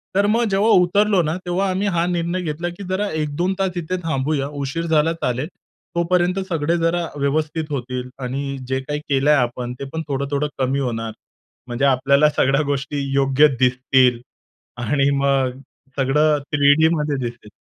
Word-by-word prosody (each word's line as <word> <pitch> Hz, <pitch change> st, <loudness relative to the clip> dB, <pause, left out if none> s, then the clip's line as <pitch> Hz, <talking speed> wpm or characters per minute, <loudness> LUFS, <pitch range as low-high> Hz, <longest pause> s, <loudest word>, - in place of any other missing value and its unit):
तर 200 Hz, +1 st, +3 dB
मग 230 Hz, +3 st, +2 dB
जेव्हा 195 Hz, +3 st, +2 dB
उतरलो 200 Hz, +1 st, +4 dB
ना, 155 Hz, +1 st, -1 dB
तेव्हा 185 Hz, +2 st, 0 dB
आम्ही 190 Hz, +2 st, -1 dB
हा 170 Hz, -3 st, +1 dB
निर्णय 175 Hz, +1 st, -1 dB
घेतला, 170 Hz, +1 st, -3 dB
की 175 Hz, +3 st, -9 dB
जरा 200 Hz, +2 st, -1 dB
1-2 155 Hz, +5 st, -1 dB
तास 190 Hz, -2 st, -1 dB
इथे 175 Hz, +2 st, -2 dB
थांबूया. 140 Hz, -2 st, -1 dB
उशीर 165 Hz, +5 st, -3 dB
झाला 160 Hz, 0 st, +2 dB
चालेल. 130 Hz, -3 st, -2 dB, 0.5 s
तोपर्यंत 175 Hz, +2 st, +1 dB
सगळे 165 Hz, 0 st, 0 dB
जरा 170 Hz, +1 st, 0 dB
व्यवस्थित 155 Hz, +3 st, -1 dB
होतील. 125 Hz, -2 st, -4 dB
आणि 135 Hz, +2 st, -4 dB
जे 130 Hz, 0 st, -1 dB
काही 150 Hz, +2 st, -4 dB
केलंय 140 Hz, +2 st, +3 dB
आपण, 125 Hz, -1 st, -1 dB
ते 140 Hz, -, -4 dB
पण 160 Hz, -, -2 dB
थोडं-थोडं 140 Hz, +1 st, -1 dB
कमी 135 Hz, +1 st, +1 dB
होणार. 115 Hz, -4 st, -2 dB, 0.6 s
म्हणजे 120 Hz, +3 st, -1 dB
आपल्याला 140 Hz, +2 st, +4 dB
सगळ्या 135 Hz, +2 st, +3 dB
गोष्टी 140 Hz, +1 st, -2 dB
योग्य 135 Hz, +2 st, +4 dB
दिसतील. 125 Hz, -1 st, +3 dB, 0.6 s
आणि 140 Hz, +4 st, +2 dB
मग 135 Hz, -2 st, +1 dB, 0.4 s
सगळं 150 Hz, +3 st, +2 dB
3D 145 Hz, +2 st, +5 dB
मध्ये 150 Hz, -2 st, -1 dB
दिसेल. 120 Hz, -3 st, -11 dB
150 Hz, 155 wpm, -21 LUFS, 135-170 Hz, 0.6 s, 3D